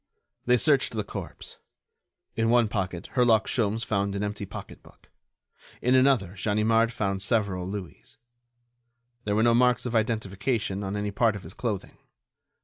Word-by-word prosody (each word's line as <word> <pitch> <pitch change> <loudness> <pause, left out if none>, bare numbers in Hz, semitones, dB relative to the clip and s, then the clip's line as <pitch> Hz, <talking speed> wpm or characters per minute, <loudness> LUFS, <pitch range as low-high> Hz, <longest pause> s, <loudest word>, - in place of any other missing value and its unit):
They 125 0 +5
searched 140 -1 +2
the 110 -2 -2
corpse. - - -8 0.8
In 115 0 +1
one 120 -1 +4
pocket 95 -5 -3
Herlock 120 -4 +4
Sholmes 115 -2 0
found 100 -1 -1
an 100 - -2
empty 105 -1 -4
pocketbook; - - -12 0.7
in 125 - +2
another 130 -8 +3
Ganimard 110 +3 +2
found 100 -3 -2
several 100 -4 0
louis. 95 -3 -8 1.1
There 105 -1 0
were 110 - +3
no 120 0 +4
marks 125 +1 +3
of 120 -1 -3
identification 110 -1 -1
on 95 +1 -3
any 105 0 -2
part 110 +1 +2
of 100 - -8
his 80 - -10
clothing. 105 -6 -4
110 Hz, 145 wpm, -26 LUFS, 100-115 Hz, 1.1 s, They